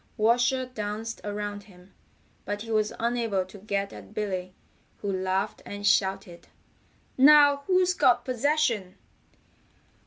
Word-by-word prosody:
Washer 240 +4 +2
danced 225 -2 -5
around 205 0 -5
him, 185 -1 -19 0.5
but 205 +1 -4
he 225 - -8
was 215 -1 +1
unable 230 -5 0
to 190 +2 -13
get 200 -1 -3
at 100 -2 -13
Billy, 185 -3 -3 0.5
who 200 - -2
laughed 190 +2 -2
and 205 0 -7
shouted: 195 -3 0 0.7
"Now 290 +1 +7
who's 365 -1 +3
got 250 -7 +3
possession?" 250 -7 0
210 Hz, 120 wpm, -27 LUFS, 195-245 Hz, 0.7 s, Now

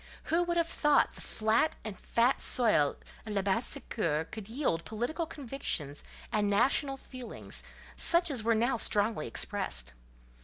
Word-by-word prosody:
Who 340 - +4
would 345 0 0
have 335 -1 +2
thought 295 -3 +3
the - - -11
flat 220 +8 +1
and 215 -3 -4
fat 235 +7 +1
soil 210 - +3 0.3
of 215 - -6
Labassecour 190 -5 -1
could 220 -3 -7
yield 230 - -1
political 245 +10 -3
convictions 245 - -3 0.3
and 210 -1 +1
national 270 +6 +2
feelings, 255 -2 -6 0.3
such 340 -1 +5
as 255 -5 +3
were 225 +1 +2
now 240 +3 +2
strongly 210 - +1
expressed? 65 - -1
230 Hz, 140 wpm, -31 LUFS, 200-275 Hz, 0.3 s, such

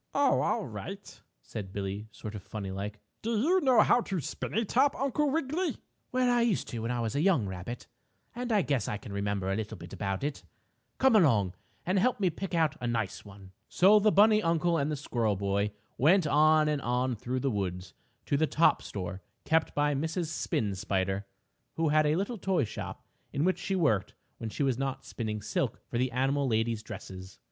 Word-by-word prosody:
"Oh, - - +3
all - - 0
right," - - -8 0.2
said 95 - -7
Billie, 100 +2 -4
sort 105 0 -8
of 105 - -6
funny 100 0 -6
like. 100 +2 -5 0.2
"Do 230 0 -1
you 355 - +3
know 260 -5 +5
how 245 - +4
to 195 -5 -3
spin 140 - -5
a 225 +1 +2
top, 265 +7 +2
Uncle 280 +2 +1
Wiggily?" 320 +4 -1 0.3
"Well, 255 0 +2
I 240 - +3
used 235 -5 +1
to 120 - -4
when 115 +1 -3
I 120 -1 -1
was 115 +1 -2
a 145 - +1
young 170 - +3
rabbit, 95 +6 -6 0.5
and 245 0 -4
I 205 -4 +3
guess 135 -7 0
I 105 - -2
can 100 0 -9
remember 100 -1 -1
a - - 0
little 110 0 -4
about 95 +1 -3
it. 145 0 -3 0.5
Come 265 -3 +4
along 115 - +4 0.3
and 185 +2 +2
help 250 +4 +2
me 185 -3 +2
pick 190 +2 -4
out 160 -3 +2
a 120 - -1
nice 115 -4 -2
one." 100 -2 -13 0.2
So 200 +4 +6
the 215 +1 +4
bunny 215 +2 +6
uncle 170 -1 +2
and 140 +2 0
the - - 0
squirrel 120 -7 -1
boy 100 +1 0 0.3
went 170 +6 +5
on 155 +1 +4
and 150 -2 0
on 125 +1 0
through 125 +4 -3
the 135 - +1
woods 90 -3 -3 0.3
to 140 - +1
the 155 +2 +2
top 165 +3 +3
store 95 -1 -6 0.2
kept 160 0 +1
by 145 0 +2
Mrs. 160 +3 -2
Spin 110 -9 -1
Spider, 95 +1 -1 0.5
who 165 -1 +1
had 155 0 +4
a 150 - +3
little 200 +5 -2
toy 185 -4 +1
shop 105 - -6 0.3
in 140 - -1
which 185 +2 +1
she 195 - -2
worked 140 - +1 0.2
when 115 - -4
she 140 - -2
was 130 -3 +1
not 135 -1 -3
spinning 105 -3 -4
silk 105 - -1
for 120 - -3
the 130 +1 +1
animal 135 +3 +1
ladies' 110 -1 0
dresses. 95 -4 -9
135 Hz, 205 wpm, -30 LUFS, -, 0.5 s, So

